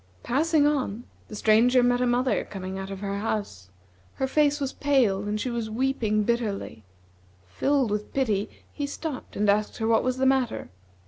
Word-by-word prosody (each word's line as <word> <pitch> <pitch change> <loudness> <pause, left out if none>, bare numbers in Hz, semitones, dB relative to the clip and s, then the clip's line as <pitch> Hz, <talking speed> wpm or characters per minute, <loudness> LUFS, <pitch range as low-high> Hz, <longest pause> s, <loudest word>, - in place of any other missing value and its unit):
Passing 300 +3 +2
on, 260 -7 0 0.2
the 215 - -9
Stranger 235 +4 +4
met 245 0 +2
a 250 - +2
mother 250 +2 +1
coming 190 -1 -6
out 195 0 -6
of 195 0 -7
her 200 0 -3
house. 200 - -4 0.5
Her 265 - -1
face 295 +2 +2
was 275 -1 -2
pale, 255 -9 +2
and 210 +1 -2
she 250 - -2
was 230 -2 -3
weeping 220 -3 0
bitterly. 210 - -2 0.6
Filled 260 - 0
with 210 0 -3
pity, 220 -6 0 0.2
he 285 -1 -3
stopped 285 -1 -6
and 210 +1 +1
asked 210 +1 +1
her 220 - -2
what 225 0 +3
was 255 0 -1
the 265 - +1
matter. 265 - +1
235 Hz, 180 wpm, -26 LUFS, 205-265 Hz, 0.6 s, Stranger